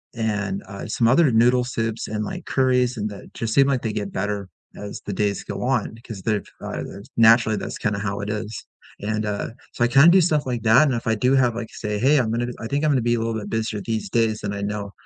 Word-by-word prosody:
and, 110 - -2
uh, 100 - -7
some 115 - +1
other 140 +3 +5
noodle 120 +2 +4
soups, 115 -3 -3
and, 105 0 -3
like, - - -6
curries, 125 -2 +1
and 105 0 -2
that 100 - -11
just 115 -1 -2
seem 140 -1 +5
like 135 -3 +1
they 110 -2 -2
get 100 -1 -3
better 100 0 -3 0.3
as 105 0 -7
the 100 - -3
days 100 0 -1
go - - -6
on, 125 -4 0
'cause 105 -5 -7
they're, 105 0 0 0.2
uh - - -4
there's 100 +1 -10
naturally, 115 -1 +5
that's - - -5
kinda 105 -2 -1
how 100 -1 -3
it 105 - -4
is, 105 0 -5 0.4
and, 110 +1 -1
uh 105 -1 -2 0.2
so, 120 - 0
I - - +5
kinda 135 +7 +7
do 185 +2 +6
stuff 155 -4 +1
like 120 -3 -2
that, 115 +6 +6
and 135 - +1
if 115 - -4
I 115 - +3
do 125 +5 +2
have, 125 -3 +3
like 115 -1 -5
say, 105 -1 -4
"Hey, 140 +6 +4
I'm 110 -3 0
gonna 120 +1 -1
I 115 - -6
think 140 +5 -1
I'm 155 - +3
gonna 130 -4 +2
be 120 +1 +1
a - - -1
little 115 0 -1
bit 105 -2 -5
busier 110 -2 -2
these 110 -1 -3
days," 110 0 +1
and 100 - -2
I 100 - -4
know 100 0 -4
115 Hz, 260 wpm, -23 LUFS, 105-125 Hz, 0.4 s, kinda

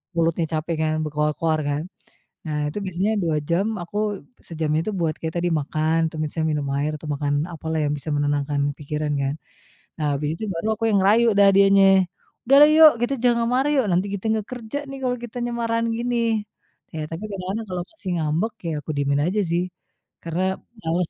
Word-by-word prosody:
mulutnya 165 0 +1
capek, 165 +2 -3
kan, 155 0 +1
berkoar-koar, 150 +1 0
kan. 145 +2 -1 0.6
Nah, 150 -1 -2
itu 205 - -5
biasanya 190 +3 0
2 165 -3 +1
jam 175 +4 +2 0.2
aku 175 +4 -9 0.5
sejamnya 155 -2 0
itu 215 - -1
buat 160 -2 +1
kayak 160 -1 -4
tadi 175 - +1
makan, 155 +3 0
atau - - -10
misalnya 155 +1 -2
minum 145 -2 -2
air 145 +2 0
atau 150 - -9
makan 145 0 -1 0.2
apalah 160 0 -3
yang 145 - 0
bisa 155 +2 -6
menenangkan 145 0 0 0.2
pikiran, 150 0 -3
kan. 135 +1 -1 0.6
Nah, 155 - -2
habis 150 +1 -2
itu - - -7
baru 165 +6 -3
aku 225 - -5
yang 205 - +3
ngerayu 215 +5 +5
dah 200 - +7
dienye, 195 0 +6 0.6
"Udahlah, 280 +4 +8
yuk, 315 -1 +10
kita 240 +3 +1
jangan 235 -1 +3
marah, 265 +3 +2
yuk. 265 -4 +3
Nanti 180 +2 +2
kite 200 +1 -5
nggak 215 -2 -2
kerja, 240 +1 -5
nih, 275 - -6
kalau 250 -1 0
kitanya 240 +1 -4
marahan 230 0 0
gini." 240 +1 -1 0.8
Ya, 155 - -3
tapi 165 +6 -5
kadang-kadang 195 +4 -4
kalau 180 -1 -3
masih 225 - -8
ngambek, 160 +8 0 0.2
ya, 160 - -2
aku - - -14
diemin 140 0 +1
aja, 200 +4 0
sih, 175 +1 +2 0.6
karena 170 +2 -2 0.4
males 165 +1 0
170 Hz, 190 wpm, -23 LUFS, 155-215 Hz, 0.8 s, yuk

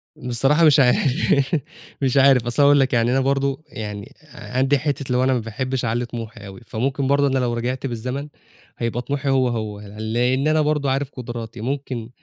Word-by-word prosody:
بصراحة 135 +6 +2
مش 150 -1 +6
عارف، 135 +3 +2 0.5
مش 135 0 +1
عارف 135 -3 +5
أصل 120 +4 +1
هاقول 145 0 +6
لك 130 -1 +1
يعني 120 +1 +2
أنا 135 - +2
برضه، 140 +2 0
يعني 105 -5 -7 0.2
عندي 135 +3 0
حتّة 145 -1 -2
اللي 125 -1 +1
هو 130 - +2
أنا 130 0 +3
ما 125 - +1
باحبش 125 +3 -3
أعلِّي 120 +2 -1
طموحي 115 -3 -8
أوي، 95 +3 -11
فممكن 135 +4 -1
برضه 140 0 +3
أنا 135 -1 +1
لو 120 -2 0
رجعت 125 +3 -3
بالزمن 125 +5 -4 0.5
هيبقى 115 +1 -2
طموحي 140 +1 -3
هو، 130 -1 +3
هو، 110 -3 -3 0.2
لإن 125 +6 0
أنا 155 0 +3
برضه 150 -2 0
عارف 135 0 -1
قدراتي، 120 -3 -7
ممكن 130 -3 -4
130 Hz, 185 wpm, -21 LUFS, 120-140 Hz, 0.5 s, مش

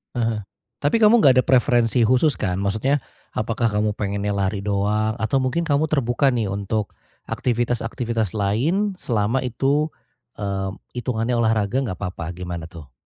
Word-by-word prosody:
Heeh, 115 -3 -1 0.3
tapi 150 +11 +1
kamu 215 +2 +7
enggak 130 -9 +6
ada - - -13
preferensi 120 -2 +3
khusus 130 +5 +3
kan? 90 -1 -1
Maksudnya 110 +8 +1 0.3
apakah 115 +2 -1
kamu 105 -1 0
pengennya 100 0 -2
lari 100 0 -1
doang? 105 +2 0
Atau 130 +5 +1
mungkin 130 +7 0
kamu 145 0 +1
terbuka 135 -2 +2
nih 120 -4 0
untuk, 100 +1 -2 0.3
aktivitas-aktivitas 115 -2 -1
lain 155 - +1
selama 115 +2 0
itu, 135 +5 +1 0.5
mmm, 100 -1 -2 0.2
hitungannya 120 -1 -1
olahraga 110 +1 +1
enggak 100 -9 -3
apa-apa 90 -3 -5
gimana 90 -2 -5
tuh? 75 -6 -12
115 Hz, 140 wpm, -22 LUFS, 100-130 Hz, 0.5 s, kamu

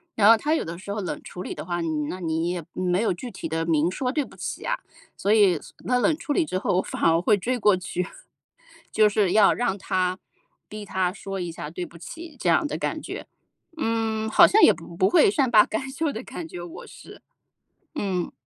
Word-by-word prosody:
然 210 -1 +5
后 230 - +8
他 300 +7 0
有 320 - +1
的 165 +1 -6
时 200 +2 -6
候 210 - -3
冷 185 - -4
处 180 - -8
理 - - -6
的 - - -7
话， 175 0 -2
你 165 - -2 0.2
那 185 - -5
你 165 -1 -1
也 175 -1 -3
没 180 +1 0
有 225 - +1
具 240 +8 -8
体 175 -3 -6
地 165 +1 -2
明 165 0 +2
说 250 +6 -2
对 295 +2 0
不 - - -16
起 - - -5
啊， - - +1 0.4
所 200 - 0
以， 200 -6 +5
所 - - -15
那 250 - +2
冷 315 +5 +3
处 330 -2 -3
理 330 - +2
之 185 - -2
后 180 - 0
我 - - +3
反 - - -7
而 165 0 +4
会 210 +3 +3
追 245 +6 -1
过 210 -4 +4
去， 180 0 -3 0.9
就 215 -1 +4
是 205 -3 +1
要 210 -2 +6
让 225 -5 -1
他 185 -1 -1 0.5
逼 210 0 -7
他 185 -2 0
说 195 0 -6
一 175 -2 -3
下 150 -2 -7
对 175 +3 -5
不 170 - -14
起 325 - -9
这 185 - -2
样 165 - +3
的 - - -4
感 - - -3
觉。 - - -7 0.5
嗯， 225 -4 -1
好 - - +7
像 435 - +4
也 - - +9
不 170 - -11
不 190 +2 +3
会 - - +5
善 265 +3 +1
罢 215 -3 +7
甘 265 +5 -4
休 300 +2 -1
的 225 - -6
感 320 +7 -7
觉， 175 - -8
我 175 -1 -9
是。 - - -13 0.7
嗯。 190 - -2
200 Hz, 255 characters per minute, -25 LUFS, 175-235 Hz, 0.9 s, 也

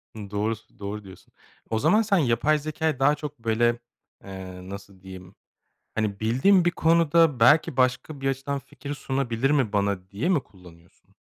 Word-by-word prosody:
Doğru 105 +1 -2
s 110 - -23
doğru 105 +1 -5
diyorsun. 95 -1 -15 0.4
O 110 - 0
zaman 215 - +4
sen 200 -3 +2
yapay 150 +2 +2
zekâyı 155 -1 -2
daha 145 +2 +4
çok, 150 -3 -8
böyle, 120 +1 +1 0.4
eee, 95 -1 -9
nasıl 100 -1 -10
diyeyim, 95 0 -11 0.6
hani, 105 -3 -2
bildiğim 135 - +3
bir 175 - +3
konuda 165 -4 +3
belki 135 +3 +4
başka 130 +3 0
bir 135 - 0
açıdan 135 +1 -3
fikir 140 +1 -8
sunabilir 135 -1 -1
mi 130 -8 +1
bana 100 -2 -1
diye 105 - -2
mi 155 -8 +2
kullanıyorsun? 85 -3 -20
120 Hz, 160 wpm, -25 LUFS, 100-145 Hz, 0.6 s, zaman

